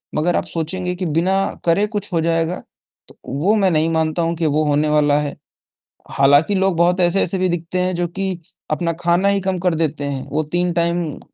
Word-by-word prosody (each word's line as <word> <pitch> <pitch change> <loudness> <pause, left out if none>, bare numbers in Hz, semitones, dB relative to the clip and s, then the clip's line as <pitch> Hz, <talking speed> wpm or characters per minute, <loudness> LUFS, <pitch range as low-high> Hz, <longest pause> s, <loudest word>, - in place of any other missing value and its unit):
मगर 175 +3 +1
आप - - 0
सोचेंगे 180 +2 -3
कि 180 0 -4
बिना 170 +5 +1 0.3
करे 175 +5 +3
कुछ 205 -2 -4
हो 165 - +2
जाएगा, 165 +2 0 0.5
तो - - -18 0.2
वो 205 +5 +3
मैं 195 -3 +3
नहीं 160 +1 +2
मानता 160 +1 0
हूँ 165 +1 0
कि 165 0 -2
वो 155 +1 +2
होने 150 +1 +1
वाला 150 -1 +3
है, 145 -1 -3 0.8
हालाँकि, 145 +8 +4
लोग 190 -2 +1
बहुत 175 +2 +2
ऐसे-ऐसे 180 +1 +2
भी 185 0 +1
दिखते 175 +1 -3
हैं, 180 0 0
जो 175 0 -1
कि 190 0 -4 0.3
अपना 170 +2 0
खाना 175 +3 +2
ही 200 0 +2
कम 190 -1 -1
कर 175 -1 +1
देते 155 -3 -1
हैं। 140 -2 -4
वो 155 +2 0
3 175 0 +1
टाइम 170 -2 -1
170 Hz, 205 wpm, -19 LUFS, 155-185 Hz, 0.8 s, हालाँकि